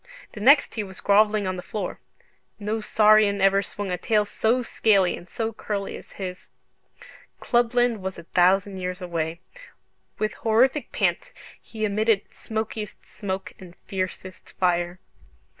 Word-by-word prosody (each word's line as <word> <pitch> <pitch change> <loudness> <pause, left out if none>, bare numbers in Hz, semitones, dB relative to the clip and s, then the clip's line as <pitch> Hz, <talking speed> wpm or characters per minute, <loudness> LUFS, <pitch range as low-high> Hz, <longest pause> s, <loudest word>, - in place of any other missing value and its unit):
The - - -9
next 280 +7 +5
he 220 - -2
was 190 -2 -10
grovelling 210 0 +3
on 185 0 -2
the - - -5
floor. 190 0 -5 0.6
No 215 +1 -2
saurian 210 -1 +4
ever 195 0 +4
swung 200 0 -5
a 180 - -2
tail 210 +2 +2
so 235 +4 +1
scaly 200 -6 +2
and 175 - -13
so 225 -1 -3
curly 205 -2 -4
as - - -12
his. 185 -1 -7 0.9
Clubland 240 -2 +2
was 190 0 -4
a 170 - -9
thousand 190 +3 +2
years 180 0 -4
away. 170 -2 -3 0.8
With 215 0 -1
horrific 250 +6 +2
pants - - -1 0.3
he 220 -1 -4
emitted 215 0 +2
smokiest 220 -1 -5
smoke 195 -2 -5
and 180 -2 -12
fiercest 185 -1 -5
fire. 175 -1 0
200 Hz, 140 wpm, -25 LUFS, 185-220 Hz, 0.9 s, next